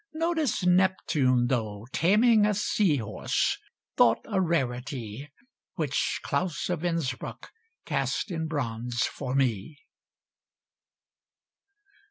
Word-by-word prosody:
Notice 320 - 0
Neptune, 180 -9 +3
though, 110 -4 -2
Taming 215 - +4
a 210 - +1
sea 200 -4 +2
horse, 110 -5 -1 0.4
thought - - +4
a 200 -4 0
rarity, 135 - -2 0.5
Which 155 -6 -1
Claus 165 +4 -1
of 175 -2 -2
Innsbruck 165 -7 -3 0.3
cast 215 - -1
in 160 -2 -2
bronze 120 -5 -2
for 130 - -3
me! 130 +1 0
150 Hz, 95 wpm, -27 LUFS, 125-185 Hz, 0.5 s, Taming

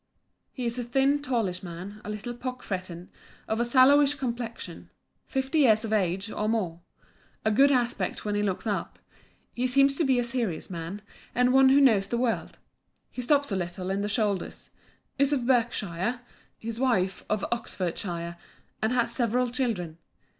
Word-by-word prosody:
'He 255 - -5
is 235 +1 -1
a - - -1
thin, 270 +4 +2
tallish 225 -10 -1
man, 185 +4 -8
a - - -7
little 210 +3 -5
pock 250 +1 -6
fretten, 185 -2 -5 0.4
of 220 - -1
a - - +3
sallowish 275 +4 +5
complexion. 240 -3 -5 0.4
Fifty 270 +3 0
years 225 -5 +5
of 220 - -2
age, 195 +1 0
or 210 0 -1
more. 180 -7 -1 0.6
Of 220 - +3
good 275 +6 +5
aspect 245 -4 0
when 210 - -1
he 205 - +1
looks 200 -1 -2
up. 210 -2 -2 0.6
He 250 +1 0
seems 275 +2 +4
to - - +2
be 265 -3 +3
a 245 - +2
serious 235 -9 -2
man, 175 +4 -6 0.3
and 250 +1 +3
one 265 0 +7
who 275 +2 +6
knows 220 -8 +4
the 235 - -1
world. 240 -2 -1 0.5
He 250 - -5
stoops 285 0 +2
a - - +1
little 180 +1 -3
in 195 +1 -1
the 205 - -1
shoulders. 205 -4 -1 0.5
Is 280 0 +4
of 255 -4 0
Berkshire. 235 -3 0 0.4
His 230 +1 -6
wife 195 -8 +1
of 215 -1 0
Oxfordshire; 175 -5 -3 0.4
and 220 - +1
has 240 -2 +1
several 245 0 +1
children. 200 -11 -2
230 Hz, 170 wpm, -27 LUFS, 195-255 Hz, 0.6 s, one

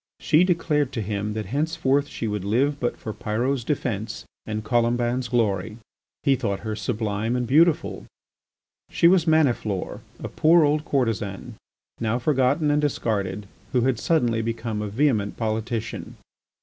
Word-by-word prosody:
She 155 +4 +4
declared 160 -6 +1
to 115 - -2
him 105 +1 -3
that 110 0 -4
henceforth 145 -2 +1
she 115 - -4
would 105 -2 -3
live 135 +8 +1
but 120 - -1
for 110 - -6
Pyrot's 120 +6 -1
defence 115 -6 -3 0.2
and 110 0 -3
Colomban's 120 +2 +1
glory. 110 -3 0 0.5
He 140 -2 +4
thought 100 -5 -2
her 110 -1 -3
sublime 110 0 -2
and 125 -1 0
beautiful. 155 +6 +2 0.8
She 170 - +4
was 175 -2 +4
Maniflore, 125 - +1 0.2
a - - -5
poor 165 +1 +4
old 150 +1 +1
courtesan, 110 -7 -2 0.5
now 115 +1 0
forgotten 140 +3 +2
and 150 0 +2
discarded, 105 -8 -1 0.3
who 125 - +3
had 125 -1 +1
suddenly 120 -9 +1
become 115 -1 -3
a 105 - -3
vehement 110 -2 0
politician. 110 0 -3
120 Hz, 145 wpm, -24 LUFS, 110-145 Hz, 0.8 s, She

